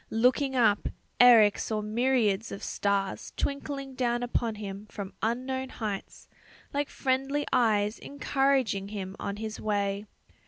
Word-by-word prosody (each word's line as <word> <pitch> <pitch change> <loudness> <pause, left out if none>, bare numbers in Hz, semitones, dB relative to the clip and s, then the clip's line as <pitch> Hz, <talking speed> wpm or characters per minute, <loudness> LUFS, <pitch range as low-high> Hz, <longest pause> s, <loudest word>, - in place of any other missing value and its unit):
Looking 255 +4 +2
up, 225 -5 +3 0.3
Eric 230 -4 +7
saw 215 -1 -2
myriads 225 -2 +1
of 195 - -7
stars 200 -1 -1
twinkling 280 -1 -3
down 245 -2 0
upon 235 -2 -1
him 205 0 -7
from 200 -2 -7
unknown 260 +3 -1
heights, 210 -6 -5 0.5
like 285 0 -1
friendly 270 +2 0
eyes 215 -4 +2
encouraging 270 -8 0
him 195 -2 -5
on 200 0 -3
his 215 +1 -5
way. 205 -1 -1
225 Hz, 125 wpm, -28 LUFS, 205-260 Hz, 0.5 s, Eric